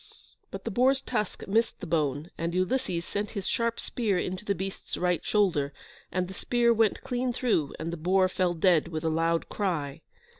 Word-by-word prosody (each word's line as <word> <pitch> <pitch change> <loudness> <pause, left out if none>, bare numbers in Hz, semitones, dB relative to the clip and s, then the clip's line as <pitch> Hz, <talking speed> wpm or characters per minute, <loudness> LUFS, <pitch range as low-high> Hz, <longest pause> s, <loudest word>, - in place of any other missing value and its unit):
But - - -7
the 230 - -2
boar's 260 +5 +4
tusk 245 -5 -3
missed 225 +4 +1
the - - -6
bone, 150 -1 0
and 170 +1 -2
Ulysses 185 -2 0
sent 205 0 -2
his 195 - -3
sharp 230 0 0
spear 215 -6 0
into 185 +2 -2
the 200 -1 0
beast's 190 +2 -5
right 180 -1 +1
shoulder, 165 -9 +2 0.4
and 180 0 0
the 190 - -8
spear 235 +4 +2
went 225 -2 +2
clean 250 0 -1
through, 225 - 0
and 165 +1 -4
the - - -3
boar 185 +4 +3
fell 185 -1 0
dead, 170 -1 +4
with 160 -2 -4
a 165 - +2
loud 165 +1 +1
cry. 155 -9 -2
185 Hz, 190 wpm, -28 LUFS, 165-220 Hz, 0.4 s, boar's